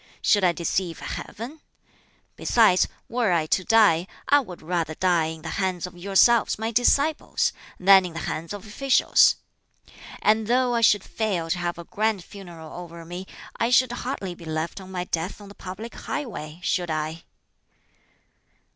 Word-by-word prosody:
Should 205 -2 +4
I 180 - +5
deceive 170 0 -2
Heaven? 250 +9 -7 0.8
Besides, 215 -6 +4 0.2
were 235 -4 0
I 165 -2 +2
to 185 +4 +1
die, 190 -5 +4 0.2
I 285 +1 +6
would 185 - -8
rather 165 -2 -2
die 175 -3 +2
in 160 -1 -7
the - - -5
hands 185 -2 -1
of 180 - -10
yourselves, 200 +5 +3
my 220 +1 -2
disciples, 280 +6 +2 0.3
than 190 0 +6
in 170 - -10
the 165 - -5
hands 160 +1 -4
of 205 -1 -7
officials. 260 +5 +4 0.9
And 215 0 +3
though 250 +1 +2
I 235 - +1
should 205 -3 +4
fail 185 -7 -2
to 180 - 0
have 175 0 -2
a 170 - -7
grand 210 +1 -1
funeral 175 -5 -11
over 170 -1 -9
me, 180 +3 -7 0.3
I 230 - +1
should 250 0 +4
hardly 245 -7 -4
be 170 -1 -13
left 160 +4 -3
on 190 0 -11
my 180 -1 -3
death 175 +2 -3
on 205 -1 -12
the - - -11
public 205 +5 -8
highway, 175 - -6
should 180 -2 0
I?" 155 +1 -3
185 Hz, 165 wpm, -25 LUFS, 170-220 Hz, 0.9 s, I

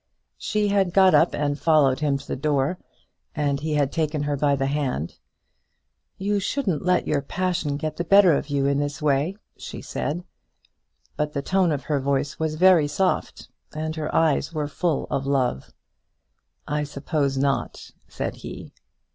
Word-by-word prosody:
She 210 -1 0
had 195 -3 +1
got 190 -1 +6
up 165 - +4
and 145 0 -1
followed 150 -5 +3
him 145 -2 +1
to 140 - -13
the - - -2
door, 145 +4 0 0.6
and 145 -3 0
he 155 +1 -2
had 145 -2 +1
taken 155 -2 -1
her 145 0 -1
by 140 0 +2
the 135 0 -1
hand. 135 - -2 1.0
"You 200 +1 0
shouldn't 195 - -1
let 180 0 +2
your 145 -2 0
passion 175 -1 -2
get 155 +1 -4
the 175 - -1
better 195 -1 +6
of 140 - -1
you 140 -1 0
in 140 0 +2
this 145 0 -3
way," 150 +5 +1 0.2
she - - -8
said; 165 +5 -4 0.9
but 150 0 -1
the 140 - -2
tone 185 -1 +2
of 145 -3 -2
her 145 0 0
voice 140 +1 -1
was 160 -1 -1
very 175 -3 +5
soft, 185 +5 -1 0.3
and 155 +1 -3
her 155 -1 -3
eyes 160 -1 +2
were 155 -3 -2
full 160 +1 -1
of 135 0 -1
love. 130 - 0 1.0
"I 150 +1 -1
suppose 140 -1 -2
not," 140 0 -1 0.2
said - - -4
he. - - -9
150 Hz, 170 wpm, -24 LUFS, 140-170 Hz, 1.0 s, got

